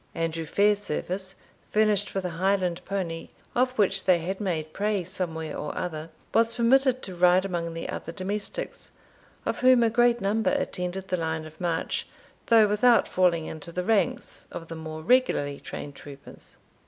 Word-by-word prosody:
Andrew 165 0 -2
Fairservice, 195 0 0 0.3
furnished 210 -2 +2
with 190 -1 -1
a - - -1
Highland 185 0 0
pony, 180 -4 -3 0.2
of 255 +1 +3
which 195 -2 +2
they 185 -2 +5
had 185 +5 -4
made 160 -6 -2
prey 205 -2 0
somewhere 165 -4 -4
or 150 - -5
other, 160 -2 -4 0.2
was 230 0 +3
permitted 255 +2 +3
to 190 - -5
ride 180 +1 +4
among 170 -3 -3
the 165 - -4
other 165 - -5
domestics, 200 - -3 0.6
of - - -1
whom 255 -1 +6
a 225 - +3
great 240 0 +4
number 215 +2 +1
attended 190 -9 -2
the 180 - +1
line 160 -1 -2
of 155 +1 -13
march, 170 -2 -1 0.4
though 225 -2 +6
without 230 +3 +4
falling 175 -3 +2
into 160 +1 -7
the 180 +2 -2
ranks 225 +4 0
of 165 - -8
the 165 - -5
more 160 0 -7
regularly 160 - +2
trained 145 - -7
troopers. 140 0 -13
185 Hz, 165 wpm, -26 LUFS, 165-210 Hz, 0.6 s, whom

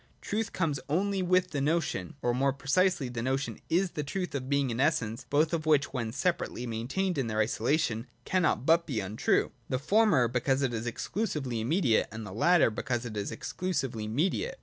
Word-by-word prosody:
Truth 215 +1 -2
comes 155 -6 -1
only 195 +5 +1
with 185 0 +2
the 145 - -1
notion: 145 - -1
or, 120 - +2
more 135 +2 +2
precisely, 140 +3 +1
the 120 -2 -4
notion 135 +3 -2
is 180 +2 +2
the 150 - -3
truth 180 +6 -3
of 130 -2 -4
being 140 -3 +1
and 115 +3 -1
essence, 125 -6 0
both 155 +4 +2
of 160 -2 -1
which, 145 -3 +3
when 115 -4 -2
separately 145 -3 -1
maintained 135 +10 -2
in 130 - 0
their 110 -1 -3
isolation, 115 +1 0 0.2
cannot 180 -7 +1
but 170 +2 +4
be 130 -8 -1
untrue, 100 +2 +1 0.2
the 130 - +1
former 175 - +3
because 130 +3 0
it 125 -2 0
is 115 +1 -3
exclusively 135 - -2
immediate, 130 - +2
and 110 -1 -6
the 105 - -8
latter 170 - +4
because 120 +2 -2
it 110 -3 -6
is 100 -1 -3
exclusively 135 -12 -3
mediate. 185 - 0
140 Hz, 190 wpm, -29 LUFS, 120-170 Hz, 0.2 s, but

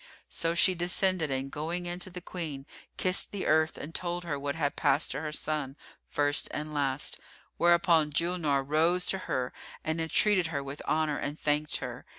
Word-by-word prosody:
So 165 0 0
she 185 +2 +6
descended 180 -1 +1
and 135 0 -2
going 170 +4 -3
in 175 0 -4
to 185 - -3
the 180 0 -8
Queen, 155 -7 -5 0.3
kissed 185 0 +2
the 200 - -4
earth 155 +1 +3
and 160 - -7
told 175 0 -2
her 150 -5 -3
what 140 +1 -3
had 145 -3 -1
passed 145 +4 +2
to 135 - -3
her 155 -1 -4
son, 150 -3 -3 0.3
first 145 0 0
and 150 +1 -5
last, 140 -1 0 0.4
whereupon 170 -2 +4
Julnar 155 -3 +1
rose 165 +5 +2
to 190 - +2
her 125 -1 -1 0.3
and 160 +1 -1
entreated 180 +2 +3
her 140 -3 -3
with 140 +2 -7
honour 155 -1 +1
and 145 +2 -4
thanked 150 0 0
her. - - -6
155 Hz, 180 wpm, -29 LUFS, 145-175 Hz, 0.4 s, she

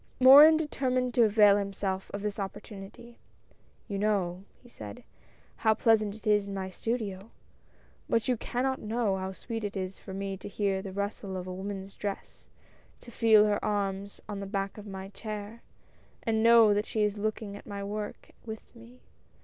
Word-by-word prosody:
Morin 285 +5 +10
determined 255 -5 -1
to 235 -1 +5
avail 210 -1 +6
himself 195 -1 -3
of 200 0 -5
this 210 0 -3
opportunity. 205 +3 -8 0.7
"You 200 -3 -3
know," 195 -3 0 0.2
he - - -16
said, 105 - -10 0.5
"how 220 -1 +3
pleasant 215 -2 +2
it 220 - -15
is 210 -1 +3
in 200 - -5
my 190 -1 -4
studio; 215 -2 -3 0.8
but 230 - +1
you 250 - +2
cannot 260 +3 -2
know 215 -2 0
how 190 0 -4
sweet 225 +3 -6
it 205 -1 -3
is 185 0 -4
for - - -10
me 195 0 -4
to - - -9
hear 195 -1 -1
the 195 -1 -7
rustle 200 -1 -4
of 180 - -5
a 185 - -5
woman's 195 +1 -6
dress, 200 -1 -6 0.5
to 240 - -12
feel 220 -3 +5
her 205 -1 0
arms 200 -1 -2
on 205 -2 -5
the 200 - -5
back 195 +1 -3
of 210 - -10
my 190 -1 -7
chair, 215 +2 -7 0.6
and 220 -1 +1
know 225 -3 +6
she 215 0 -1
is 210 0 0
looking 215 -1 -3
at - - -12
my 200 -1 -5
work 210 +1 -6
with 220 +1 -9
me. 235 +2 -15
205 Hz, 175 wpm, -29 LUFS, 195-225 Hz, 0.8 s, Morin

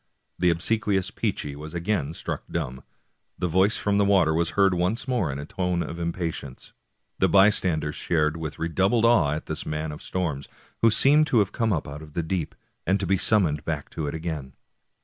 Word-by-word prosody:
The 90 - +4
obsequious 100 +2 0
Peechy 95 -10 -3
was 75 +3 -8
again 85 -4 -1
struck - - -4
dumb. 65 -6 -4 0.5
The 90 - -1
voice 95 +5 +3
from 100 0 +1
the - - +4
water 95 -5 +4
was 85 +2 +1
heard 95 -2 +5
once 90 +9 -1
more 120 - 0
in 70 - -5
a 70 - -6
tone 90 +1 -1
of 85 - -6
im 85 0 -1
patience; 80 -7 -6 0.5
the - - +3
bystanders 95 -7 +3
stared 75 -2 +1
with 80 -3 -5
redoubled 95 +8 +1
awe 95 -12 +4
at 75 - -4
this - - -3
man 75 0 -3
of 75 - -9
storms, 80 -7 -3 0.3
who 115 - +6
seemed 145 +7 +5
to 120 - +2
have 105 -2 +3
come 115 -2 0
up 80 -6 -1
out 70 +2 -7
of 75 -1 -12
the 85 - -1
deep, 80 -1 -3 0.3
and 95 +2 +3
to 100 - -1
be 95 +2 +2
summoned 90 -7 +2
back 75 -2 -4
to 80 -2 -4
it 70 - -3
again. 80 -5 -5
85 Hz, 205 wpm, -25 LUFS, 75-100 Hz, 0.5 s, who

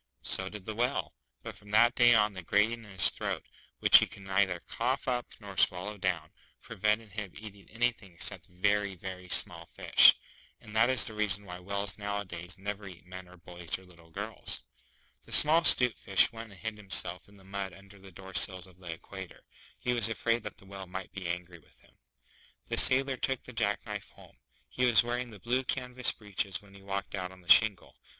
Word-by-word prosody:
So 95 0 -3
did 105 -2 -10
the 110 - -5
Whale. 125 +5 -2 0.3
But - - -9
from 105 - -18
that 115 +3 +4
day 120 -2 +4
on, 105 -1 +2
the 95 - -8
grating 110 +6 0
in - - -15
his 95 -4 +2
throat, - - -5 0.3
which - - +8
he - - -1
could 100 - -14
neither 95 -2 0
cough 130 +4 -3
up 125 -1 -1
nor 100 -2 -11
swallow 95 +4 0
down, 90 -3 -3 0.3
prevented 105 +2 -3
him 105 -3 -7
eating 100 -2 -13
anything 115 -4 -3
except - - -6
very, 100 +2 -1
very 90 0 -9
small 85 -1 -2
fish; - - +6 0.4
and 105 - -14
that 115 +3 +3
is 130 -3 +1
the 110 - -7
reason 105 -1 -1
why 90 -1 -9
whales 100 +1 -5
nowadays 95 -4 -6
never 100 +1 -7
eat 90 -2 -13
men 90 0 -11
or 90 +1 -17
boys 85 0 -5
or 95 - -18
little 85 -2 -18
girls. 80 - -3 0.6
The - - -17
small 155 +3 +7
'Stute 125 -6 +6
Fish 100 +4 +3
went 115 0 -10
and 95 - -16
hid 110 -1 -6
himself 95 -3 +1
in 100 - -20
the 95 - -19
mud 95 0 -6
under 100 +1 -16
the 95 0 -15
Door 95 +2 -13
sills 95 -1 +3
of 95 -1 -20
the 90 -3 -8
Equator. 95 +2 -11 0.3
He 125 - -2
was 115 -2 +3
afraid 115 +2 -1
that 105 -1 -9
the 105 - -18
Whale 95 -1 -10
might 95 +1 -8
be 95 -3 -7
angry 90 0 -6
with - - -27
him. - - -27 0.7
The - - -3
Sailor 135 0 +8
took 135 -1 -2
the 130 - -13
jack 100 -3 -2
knife - - -7
home. - - -20 0.3
He 125 - -4
was 120 -1 +5
wearing 120 +1 -4
the 110 - -13
blue 125 +7 -2
canvas 125 -1 +1
breeches 100 -2 -2
when 100 -1 -20
he 100 - -16
walked 100 0 -6
out 90 -2 -5
on 95 0 -17
the 85 - -19
shingle. 105 -5 +4
100 Hz, 210 wpm, -29 LUFS, 95-110 Hz, 0.7 s, which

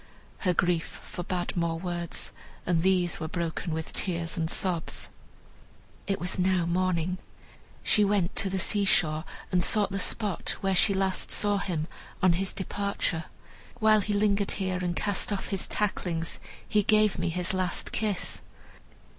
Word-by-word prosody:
Her 180 -3 +1
grief 175 -1 0
forbade 175 0 -4
more 170 -2 0
words, 175 -1 -1 0.3
and 170 -2 +2
these 180 -2 +2
were 160 - -3
broken 170 +1 -3
with 160 0 -4
tears 170 -3 -1
and 160 -1 -1
sobs. 175 -3 0 1.0
It 195 - 0
was 180 +1 -1
now 185 -1 +2
morning. 180 0 0 0.6
She 210 - +4
went 200 -3 +1
to 195 - +2
the 190 - -1
seashore, 175 -5 +2 0.3
and 180 -1 +3
sought 205 +1 +3
the 195 - -2
spot 205 -2 +1
where 195 0 +1
she 200 +2 +5
last 190 -1 +1
saw 205 -1 +2
him, 165 -6 -2 0.3
on 185 -2 +4
his 190 +2 0
departure. 190 -4 -2 0.5
"While 215 -1 +5
he 205 +2 -2
lingered 205 -1 +2
here, 185 -2 -1
and 175 -1 -1
cast 205 +1 +1
off 195 -2 -3
his 195 -2 0
tacklings, 175 -5 -1 0.3
he 210 - +3
gave 215 0 +3
me - - 0
his 180 +2 0
last 185 -1 0
kiss." 210 -4 -2
185 Hz, 155 wpm, -28 LUFS, 170-200 Hz, 1.0 s, she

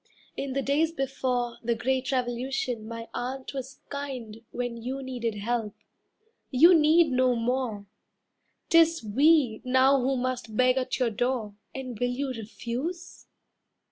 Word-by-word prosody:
In 275 -1 -3
the 275 0 -1
days 300 +4 +2
before 255 -5 -2
The 235 0 0
Great 260 +3 -1
Revolution 245 -2 -2
my 230 0 -6
aunt 260 +2 -4
was 265 0 -7
kind 255 -6 -6
When 245 -1 -4
you 265 +3 -4
needed 240 -4 -3
help. 215 0 -2 0.7
You 320 +7 +7
need 315 0 +5
no 255 -1 +3
more; 230 -3 -1 0.9
'Tis 330 -3 +5
we 260 +1 +3
now 260 +1 +4
who 265 +1 +1
must 245 -3 -3
beg 255 0 +4
at 255 - -2
your 250 -3 +1
door, 235 -1 -1 0.2
And 255 -4 -6
will 245 - +1
you 265 +3 -2
refuse?" 255 - -6
255 Hz, 140 wpm, -27 LUFS, 235-270 Hz, 0.9 s, You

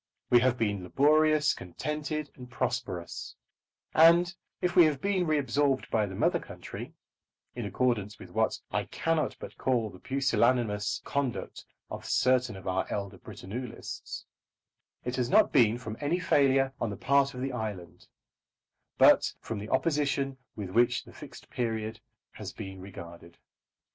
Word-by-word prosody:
We 120 - +8
have 125 0 +2
been 105 -4 0
laborious, 150 - +4
contented, 150 - -4
and 125 -1 -11
prosperous; 120 -9 -3 0.6
and 170 +2 +6 0.3
if 180 -1 -1
we 175 -3 +9
have 150 -3 +1
been 190 -1 0
reabsorbed 145 -2 +1
by 110 -2 +2
the 95 - -7
mother - - +2
country, - - -9 0.6
in 120 -3 -4
accordance 105 -2 0
with 90 - -12
what - - +1
I - - 0
cannot 165 -1 -1
but - - -10
call 120 -5 +1
the 90 - -13
pusillanimous 120 -5 +1
conduct 140 -4 -3 0.3
of - - -6
certain 125 -3 +2
of 95 - -10
our 95 0 0
elder 100 -1 -4
Britannulists, 115 +5 -7 0.8
it 125 +1 -2
has 125 -1 0
not - - +5
been 120 -4 +5
from 110 -3 -6
any 150 +4 0
failure 135 -6 +3
on 115 - 0
the 100 - -5
part 140 +4 +2
of 125 - -5
the 135 +1 -2
island, 105 -7 -6 0.9
but - - +6
from 115 - -5
the 105 +2 -7
opposition 140 -2 0 0.2
with 100 -4 -5
which 120 +4 +3
the - - -15
Fixed - - -11
Period 110 -2 -2 0.3
has 105 -2 -8
been 95 -3 -8
regarded. 85 -3 -11
125 Hz, 150 wpm, -29 LUFS, 105-140 Hz, 0.9 s, we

